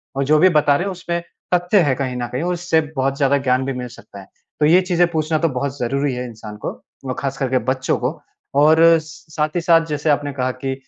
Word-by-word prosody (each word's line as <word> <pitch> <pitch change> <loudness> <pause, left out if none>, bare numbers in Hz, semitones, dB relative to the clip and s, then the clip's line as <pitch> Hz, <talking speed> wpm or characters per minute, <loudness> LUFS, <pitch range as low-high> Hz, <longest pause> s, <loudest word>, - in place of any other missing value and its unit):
और 135 - 0
जो 155 +2 +4
भी 185 +4 +6
बता 145 -1 +3
रहे 175 - 0
हैं, 200 - -2
उसमें 170 -1 -4 0.3
तथ्य 180 +3 +3
है 145 -5 +1
कहीं 130 -1 -3
न 120 -1 -3
कहीं 130 +5 -2
और 180 +1 0
उससे 175 -2 +1
बहुत 135 0 0
ज़्यादा 140 -1 +3
ज्ञान 130 -1 0
भी 135 - -2
मिल 125 -1 -5
सकता 100 - -13
है।" 95 - -13 0.3
तो 150 - +3
ये 170 +5 +5
चीज़ें 175 -1 +2
पूछना 155 -1 0
तो - - +3
बहुत 140 +1 -3
ज़रूरी 135 +3 -1
है 125 0 -4
इंसान 110 -2 -10
को - - -1 0.3
और 130 - -2
खास 135 -1 -3
करके 130 -2 0 0.2
बच्चों 130 0 -1
को। - - -3 0.4
और 155 +2 +5 0.2
स 155 -1 -14
साथ 150 -1 +1
ही 175 - +1
साथ 165 -1 +4
जैसे 150 0 -2
आपने 145 0 +1
कहा 130 -1 -1
कि 135 +1 -4
140 Hz, 250 wpm, -20 LUFS, 130-165 Hz, 0.4 s, भी